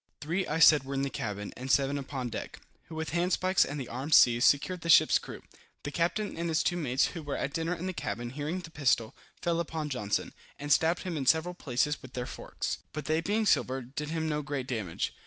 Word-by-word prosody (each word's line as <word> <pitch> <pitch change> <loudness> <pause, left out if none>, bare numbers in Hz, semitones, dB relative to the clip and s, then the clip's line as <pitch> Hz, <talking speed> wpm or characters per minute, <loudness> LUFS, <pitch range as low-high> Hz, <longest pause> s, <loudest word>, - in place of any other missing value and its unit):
Three, 175 +6 -2
I 150 - -1
said, 150 -3 +7
were 135 +1 -5
in 135 - 0
the 140 - -2
cabin, 105 -2 -4
and 130 +2 -7
seven 140 +1 +2
upon 135 -2 -4
deck, - - -6 0.3
who 160 - -10
with 160 0 -3
handspikes 180 +2 +2
and 145 +1 -4
the 130 - -5
arms 135 +6 +1
seized, 120 -1 +6
secured 170 +5 +2
the 165 - -5
ship's - - +6
crew. - - -10 0.4
The 145 - -4
captain 175 +7 -1
and 170 +1 -2
his 160 -1 +1
two 175 - +1
mates, 140 -5 +1
who 170 - -7
were 145 -2 -4
at 140 - -3
dinner 165 +2 -1
in 175 +2 -6
the 185 - -2
cabin, 120 -7 -4
hearing 150 +7 -3
the 170 -2 -11
pistol, 130 -5 +1 0.3
fell 170 -1 +1
upon 160 -2 -3
Johnson, 105 -7 -2 0.2
and 145 0 +2
stabbed 165 +2 +2
him 180 -4 -3
in 135 -3 -3
several 165 +4 +3
places 145 -2 -1
with 130 -2 -12
their 125 -1 -3
forks, - - -5
but 150 -1 -5
they 155 +2 +1
being 210 +5 0
silver, 135 -9 +2
did 145 +5 -6
him 160 0 -2
no 150 -1 -1
great 145 -3 -4
damage. 110 -10 -3
150 Hz, 230 wpm, -30 LUFS, 130-165 Hz, 0.4 s, said